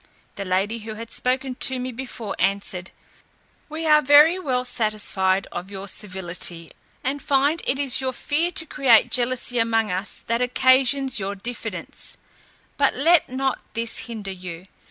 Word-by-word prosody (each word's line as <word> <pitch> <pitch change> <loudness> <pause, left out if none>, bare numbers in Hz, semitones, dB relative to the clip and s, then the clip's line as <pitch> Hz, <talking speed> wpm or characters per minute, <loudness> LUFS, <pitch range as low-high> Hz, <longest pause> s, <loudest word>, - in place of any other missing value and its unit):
The 200 - -5
lady 195 +5 -1
who 220 0 -8
had 230 +1 -9
spoken 260 +1 -1
to 260 +1 +2
me 255 +1 -4
before 235 -4 -6
answered, 195 -2 -1 0.8
"We 315 +2 -5
are 300 -1 +5
very 300 +5 +6
well 255 -7 -1
satisfied 210 -5 +1
of 180 +2 -6
your 195 0 -7
civility, 180 -4 -4 0.3
and 275 +2 -2
find 285 +4 +2
it 265 - +1
is 275 -2 +4
your 260 0 -1
fear 300 +6 0
to 320 - 0
create 265 -7 +4
jealousy 245 0 0
among 225 -2 +1
us 190 +3 -1
that 230 +1 -2
occasions 260 +1 +3
your 200 +1 -3
diffidence; 235 +5 -7 0.6
but 280 -1 +2
let 315 +3 +3
not 265 +1 -1 0.2
this 230 0 -1
hinder 210 -4 -6
you. 180 -2 -8
240 Hz, 155 wpm, -23 LUFS, 200-270 Hz, 0.8 s, very